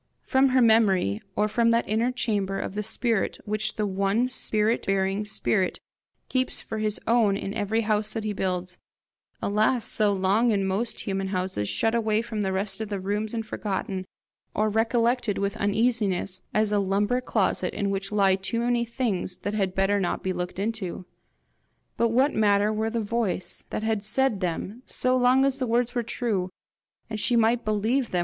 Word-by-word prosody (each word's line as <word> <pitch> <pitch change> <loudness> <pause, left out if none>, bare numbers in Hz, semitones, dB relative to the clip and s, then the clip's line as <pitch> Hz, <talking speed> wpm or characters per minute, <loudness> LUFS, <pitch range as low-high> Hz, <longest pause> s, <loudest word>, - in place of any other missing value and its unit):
From 265 0 +3
her 255 -1 +4
memory, 195 - +3
or 210 - +2
from 230 +2 +2
that 230 0 +2
inner 225 +4 +1
chamber 205 -6 -1
of - - -4
the 210 - -2
spirit 220 0 0
which 215 +1 -2
the 215 - 0
one 200 +5 +1
spirit 220 -2 0
bearing 195 +1 0
spirit 200 -2 0 0.5
keeps 255 -1 0
for 220 - -5
his 215 -1 -1
own 225 -4 +3
in 200 - -4
every 220 +1 0
house 215 -1 0
that 225 - -3
he 215 -1 -2
builds 180 -2 -3 0.6
alas 215 +3 +2
so 210 -3 +2
long 200 +5 +2
in 200 -3 +1
most 200 +5 -1
human 195 -1 -2
houses 185 - -2
shut 225 0 +1
away 220 -1 +1
from 220 -3 -4
the 190 -1 0
rest 195 +2 0
of 220 - -4
the 200 -2 -3
rooms 210 +4 -2
and 225 -1 -3
forgotten, 190 -3 -3 0.5
or 215 0 +1
recollected 230 0 +1
with 200 0 -1
uneasiness 205 -3 0
as 215 -1 +1
a 205 - +3
lumber 205 +5 +1
closet 195 -6 0
in 200 -1 -1
which 195 0 -3
lie 200 -2 +4
too 195 +4 -3
many 240 0 +1
things 225 -7 -2
that 205 - -4
had 195 -3 -1
better 195 +1 +2
not 180 - -2
be 190 - -1
looked 180 0 -4
into? 195 -3 -3 0.9
But 235 - +2
what 260 +5 +3
matter 210 0 +3
where 220 +1 -1
the 230 0 -1
voice 205 -5 -2
that - - -3
had 220 -2 0
said 230 0 +1
them, 185 +5 -3
so 255 0 +1
long 255 +1 +4
as 275 -1 +1
the 255 -2 -2
words 240 +1 +1
were 245 - 0
true, 215 -5 -2 0.6
and 220 -1 -5
she 240 +3 +2
might 230 +1 +3
believe 220 +4 0
them! 180 - 0
215 Hz, 185 wpm, -26 LUFS, 195-230 Hz, 0.9 s, her